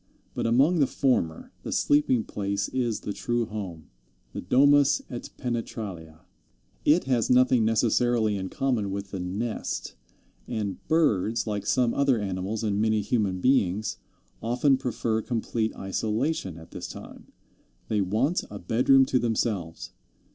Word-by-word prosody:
But - - -1
among 140 +9 +3
the 140 - +4
former 125 - 0
the - - -6
sleeping 140 -5 +2
place 100 -1 -3
is 120 -4 -1
the 100 - -4
true 120 +2 -1
home, 95 -8 -7 0.4
the - - -4
domus 140 +7 +4
et 120 - -6
penetralia. 100 - -5 0.6
It 155 +4 +4
has 125 -4 0
nothing 125 -2 +4
necessarily 115 0 +2
in 95 -1 -4
common 125 -7 -1
with 100 0 -5
the 95 - -4
nest, 100 +6 -3 0.5
and 105 -5 -3
birds, 115 - +2
like 105 -2 -3
some 125 -2 +2
other 140 -4 +2
animals 100 +2 -3
and 105 -1 0
many 110 -1 +2
human 100 -3 -1
beings, 110 -5 +1 0.4
often 125 +4 +2
prefer 115 -3 -1
complete 115 -1 -2
isolation 105 - -2
at 80 - -13
this - - -6
time. - - -11 0.6
They 105 -2 +1
want 110 - 0
a 100 - -7
bedroom 125 +8 +4
to 130 - +1
themselves. 110 -8 -2
110 Hz, 140 wpm, -26 LUFS, 100-125 Hz, 0.6 s, the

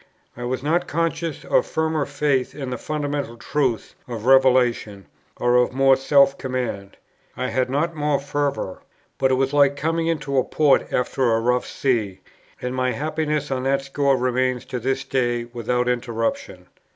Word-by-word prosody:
I 120 - -6
was 130 +1 -3
not 170 +4 +1
conscious 165 -1 -2
of - - +3
firmer 160 -2 -1
faith 140 -2 0
in 135 -3 -5
the 125 - -3
fundamental 145 -5 -3
truths 125 -2 -1
of 115 -3 -6
Revelation, 125 -6 +3 0.3
or 120 0 +3
of 125 0 +2
more 135 0 +5
self 140 +1 +3
command; 125 -7 -4 0.4
I 130 - -2
had 130 -1 0
not 155 +5 -1
more 150 -2 0
fervour; 140 -8 -3 0.4
but 130 - +3
it 130 - +3
was 135 +1 0
like 140 -1 +4
coming 165 +3 -1
into 145 -5 0
port 150 -3 +2
after 125 0 +1
a - - +1
rough 125 +2 0
sea; 110 -8 -1 0.4
and 125 0 -4
my 130 -1 0
happiness 150 -1 -2
on 130 -1 -1
that 135 0 +1
score 135 0 +1
remains 130 0 0
to 125 - -4
this 135 +3 -1
day 120 -3 0
without 120 +1 -2
interruption. 120 -2 -2
135 Hz, 165 wpm, -22 LUFS, 125-145 Hz, 0.4 s, more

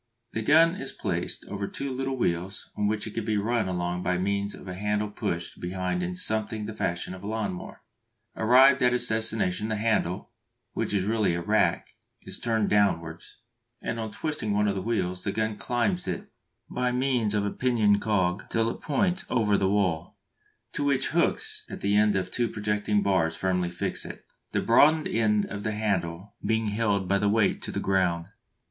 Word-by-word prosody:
The 110 - -2
gun 160 +8 +5
is - - -5
placed - - -3
over 100 -1 -4
two 140 -1 -4
little 135 +1 -2
wheels 90 -2 -2
on 105 0 0
which 105 0 -1
it 110 - -7
can 115 - -2
be 110 0 0
run 110 +1 0
along 90 -1 -2
by 90 0 0
means 100 +2 -1
of - - -12
a 90 - -4
handle 105 +2 -1
pushed 85 -4 -4
behind 90 0 -2
in 90 0 -3
something 110 +2 -1
the 110 - -5
fashion 85 -3 -2
of 95 - -9
a 100 - -7
lawn 110 -3 -2
mower. 90 - -9 0.5
Arrived 130 +4 +6
at 125 0 +4
its 125 - 0
destination, 110 -3 0
the 110 - -1
handle, 105 -5 0 0.4
which - - -2
is 100 -2 +1
really 105 -4 +1
a 85 - -2
rack, 110 +3 +2 0.3
is - - -6
turned 110 -3 +1
downwards, 85 -2 0 0.4
and 115 0 -2
on 110 -1 -3
twisting 110 -3 -3
one 105 +1 +2
of 100 - +1
the 95 - -3
wheels 90 -4 -1
the 100 - -1
gun 110 +1 -1
climbs 105 -5 -1
it - - -4 0.4
by 125 0 -1
means 125 -4 +1
of 105 -1 +1
a 100 - -1
pinion 110 -5 +2
cog 95 -3 0
till 115 0 +1
it - - -9
points 180 +4 0
over 110 -4 +2
the 95 -1 +2
wall, 95 -6 0 0.5
to 145 - -2
which 140 -2 +1
hooks 430 - +1
at - - -7
the 100 +1 +1
end 105 -1 +4
of 95 - -1
two 120 -1 +1
projecting 105 0 0
bars 85 -4 +2
firmly 90 -2 0
fix 85 - -3
it, - - -9 0.3
the - - 0
broadened 150 +7 +5
end 105 -2 +2
of 100 - -6
the 110 +1 -2
handle 95 -3 -2
being 110 -1 +1
held 105 -3 0
by 100 +2 +3
its 105 - 0
weight 105 0 +2
to - - -4
the - - -2
ground. 90 -3 +1
105 Hz, 195 wpm, -27 LUFS, 95-115 Hz, 0.5 s, Arrived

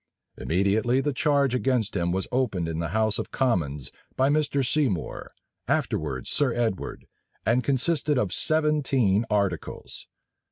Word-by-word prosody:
Immediately 100 +8 +1
the 145 +1 -1
charge 140 -2 +2
against 125 -5 0
him 85 -2 0
was 95 +2 -1
opened 110 -10 0
in 80 -1 -3
the 85 - -1
house 110 +4 +1
of - - -4
commons 80 - -1 0.2
by 130 +1 +3
Mr. 145 -2 +1
Seymour, 125 - -1 0.4
afterwards - - -1
Sir 140 -4 +2
Edward, 115 -5 -2 0.4
and 120 +3 +2
consisted 145 +2 +1
of 100 -7 0
seventeen 135 -9 +2
articles. 100 -7 -2
120 Hz, 130 wpm, -26 LUFS, 95-140 Hz, 0.4 s, by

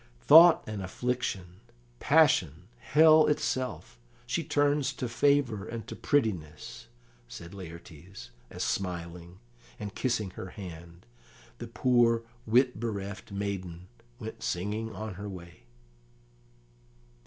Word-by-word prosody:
"Thought 165 - +8
and 105 -2 -5
affliction, 95 -3 -3 0.4
passion, 95 - +3
hell 155 +1 +5
itself, 130 -4 -2 0.3
she 165 +7 -2
turns 145 -2 +1
to 125 -1 -4
favour 120 -4 +1
and 115 -2 -6
to - - -8
prettiness," 80 - -2 0.4
said 85 +9 -10
Laertes, 85 -5 -11 0.2
as - - -5
smiling, 85 -1 -4 0.4
and 100 -1 -6
kissing 115 -7 -1
her 95 - -8
hand, 85 -3 -11 0.5
the - - -6
poor 120 -2 +2 0.2
wit 125 +1 +3
bereft 100 -3 -5
maiden 95 -3 -5 0.3
went 110 -2 -8
singing 105 +5 -3
on 110 -2 -6
her 105 - -5
way. 85 -7 -11
105 Hz, 110 wpm, -29 LUFS, 90-125 Hz, 0.5 s, Thought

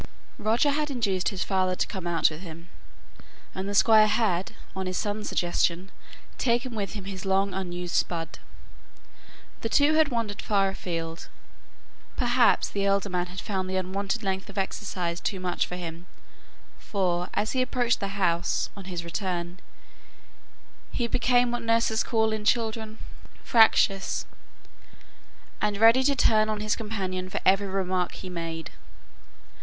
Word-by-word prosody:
Roger 225 +7 +2
had 300 +1 -1
induced 200 -9 0
his 195 -4 -3
father 185 -2 +1
to - - 0
come 185 -3 -6
out 170 -2 +3
with 155 +2 -8
him; 170 -1 -10 0.8
and 190 +1 -4
the 205 - -3
Squire 215 0 +6
had, 205 -4 0 0.2
on 190 -1 -3
his 185 - -2
son's 210 0 -2
suggestion, 175 +1 0 0.5
taken 240 0 +1
with 200 -4 -3
him 205 -3 -6
his 190 -1 -6
long 195 0 +1
unused 180 -2 -4
spud. 165 -2 -1 1.2
The 225 - -2
two 285 +6 +4
had 315 -1 +4
wandered 230 -5 -2
far 195 -3 +2
afield; 165 -3 -5 0.9
perhaps 245 -1 +3
the 200 - -3
elder 200 0 +1
man 180 -1 -1
had 185 +1 -7
found 190 -2 -3
the 190 - -2
unwonted 195 +4 -2
length 190 0 -2
of 200 - -11
exercise 185 -3 -2
too 195 - -2
much 180 -1 -1
for 180 - -6
him; 170 0 -7 0.7
for, 180 -3 -1
as 215 - 0
he 260 - +1
approached 245 -2 +1
the 195 0 -4
house, 170 -3 +1
on 200 -2 -9
his 175 -2 -5
return, 175 0 -3 1.3
he 240 - -1
became 245 +1 +2
what 240 0 -2
nurses 230 -1 +2
call 220 -1 +1
in 215 -1 -3
children 220 -1 0 0.5
"fractious," 220 -4 +4 1.4
and 205 -1 0
ready 225 +4 +6
to 280 +1 +2
turn 215 -4 +4
on 215 -1 -1
his 215 0 0
companion 190 -5 -4
for - - -2
every 195 +1 +4
remark 185 -1 -1
he 185 - -8
made. 165 -2 -5
195 Hz, 150 wpm, -27 LUFS, 180-220 Hz, 1.4 s, Squire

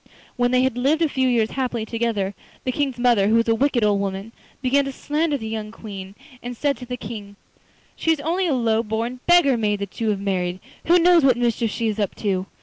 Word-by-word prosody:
When 245 0 +2
they 255 0 +3
had 260 -2 0
lived 300 +6 +2
a - - +3
few 260 -2 0
years 230 -3 +2
happily 250 -4 -2
together, 225 -4 -1 0.3
the 255 - -1
King's 270 -2 -1
mother, 240 -5 +3
who 220 - +3
was 230 0 +3
a 225 - +4
wicked 250 0 +1
old 205 -1 +3
woman, 195 +2 -4 0.3
began 275 +1 +2
to 275 - -3
slander 295 +2 -1
the 220 -4 -6
young 220 -1 -4
Queen, 200 -3 -9 0.3
and 245 0 -6
said 285 +1 +1
to 250 - -10
the 250 0 -4
King: 205 -3 -8 0.6
'She 325 - +2
is 315 - -5
only 350 +5 0
a 310 - +1
low 225 -2 +2
born 230 +3 -3
beggar 345 -8 +5
maid 210 -2 0
that 200 +2 -7
you 225 - +1
have 205 -2 0
married; 185 -2 -2 0.3
who 345 +2 +6
knows 345 -2 +5
what 260 -3 +4
mischief 235 -1 0
she 230 +2 -2
is 215 0 -2
up 200 -3 -1
to? 190 -3 -1
235 Hz, 235 wpm, -22 LUFS, 210-265 Hz, 0.6 s, who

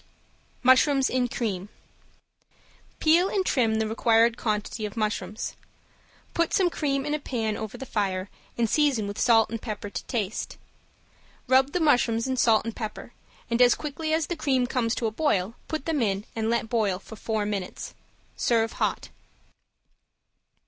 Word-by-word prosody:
~MUSHROOMS 260 +2 +4
IN 250 -1 +1
CREAM~ 205 -5 -3 1.3
Peel 340 +4 +4
and 385 -3 0
trim 230 -9 +2
the 220 0 0
required 230 +1 +3
quantity 215 0 -2
of 210 +1 -5
mushrooms. 215 -1 -2 0.8
Put 335 -1 +1
some 370 -4 +3
cream 275 -3 -1
in 295 - -1
a 300 - 0
pan 225 -6 -2
over 220 -1 -6
the 265 - -7
fire 195 -5 -1 0.3
and 235 -1 +2
season 275 -4 +2
with 200 +1 -5
pepper 225 -2 +4
and 225 - -4
salt 210 -2 -6
to 175 - -4
taste. 220 -3 -3 0.9
Rub 265 +2 +4
the 360 - +1
mushrooms 245 -7 +3
in 260 0 -1
salt 225 -3 +3
and 230 - -4
pepper, 220 +1 -6 0.3
and 235 +1 +1
as 245 -1 +6
quickly 310 +1 -4
as 320 0 +2
the 350 - -3
cream 270 -5 +1
comes 245 -2 0
to 235 - -2
a 220 - 0
boil 215 -6 0
put 310 -3 -4
them 315 -4 0
in 200 -2 0
and 225 0 -1
let 235 -1 0
boil 215 -5 +1
for 220 - -12
four 215 0 -2
minutes. 200 -3 -4 0.4
Serve 225 -1 +1
hot. - - -2
230 Hz, 165 wpm, -26 LUFS, 215-270 Hz, 1.3 s, as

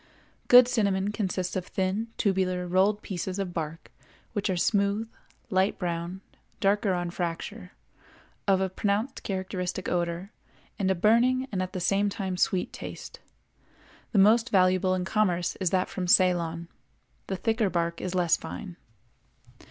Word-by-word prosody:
Good 245 0 +9
cinnamon 200 -5 +1
consists 185 -4 -2
of 185 -1 -3
thin, 190 +4 -1
tubular, 185 -3 0
rolled 195 +4 +2
pieces 185 0 -4
of 190 -3 -3
bark 160 0 -5 0.4
which 205 -1 -1
are 185 - 0
smooth, 200 +3 +1 0.4
light 190 +1 +2
brown 175 +1 -3 0.4
(darker 200 0 +2
on 175 -1 -3
fracture), 180 +3 -5 0.7
of 190 -1 +3
a 190 - +1
pronounced 205 +7 -1
characteristic 185 -1 -3
odor, 175 +2 -2 0.5
and 190 -2 +1
a 190 - +2
burning 240 +7 +3
and 190 -3 -1
at 185 +1 -4
the 185 - -3
same 195 +3 +2
time 195 -3 -3
sweet 180 0 0
taste. - - -8 0.9
The 220 - 0
most 225 +5 +5
valuable 185 -1 +3
in 185 0 -2
commerce 185 -4 +1
is 185 -3 0
that 185 0 +1
from 185 -2 -4
Ceylon; 170 -2 +3 0.6
the 190 - -2
thicker 220 +2 0
bark 170 -1 -1
is 185 0 -3
less 175 -2 +3
fine. 180 -5 -8
190 Hz, 145 wpm, -27 LUFS, 180-205 Hz, 0.9 s, Good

